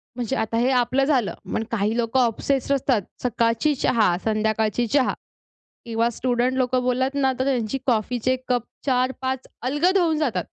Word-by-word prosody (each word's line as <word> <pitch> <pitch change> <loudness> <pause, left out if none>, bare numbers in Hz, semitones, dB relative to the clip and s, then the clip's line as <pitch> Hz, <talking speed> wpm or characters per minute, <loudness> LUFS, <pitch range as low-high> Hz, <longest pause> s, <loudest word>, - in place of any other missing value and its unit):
म्हणजे 250 +1 -2
आता 220 +1 -1
हे 245 +3 +2
आपलं 260 +3 +1
झालं. 260 -8 +1 0.2
पण 220 - 0
काही 215 +1 0
लोकं 235 +2 +1
ऑब्सेस्ड 260 +3 +1
असतात. 255 -4 +1 0.2
सकाळची 235 +4 +1
चहा, 215 -9 +2
संध्याकाळची 220 +1 0
चहा 270 +1 +2 0.7
किंवा 230 0 0
स्टुडंट 250 +2 0
लोकं 255 0 +1
बोललात 260 +2 0
ना 265 -2 +2
तर 260 - +1
त्यांची 255 -2 0
कॉफीचे 245 +1 +1
कप 245 -2 +1 0.2
4, 255 -1 +2
5 260 0 -3
अलगद 295 +10 +2
होऊन 330 -4 +2
जातात. 245 - 0
250 Hz, 160 wpm, -23 LUFS, 230-265 Hz, 0.7 s, हे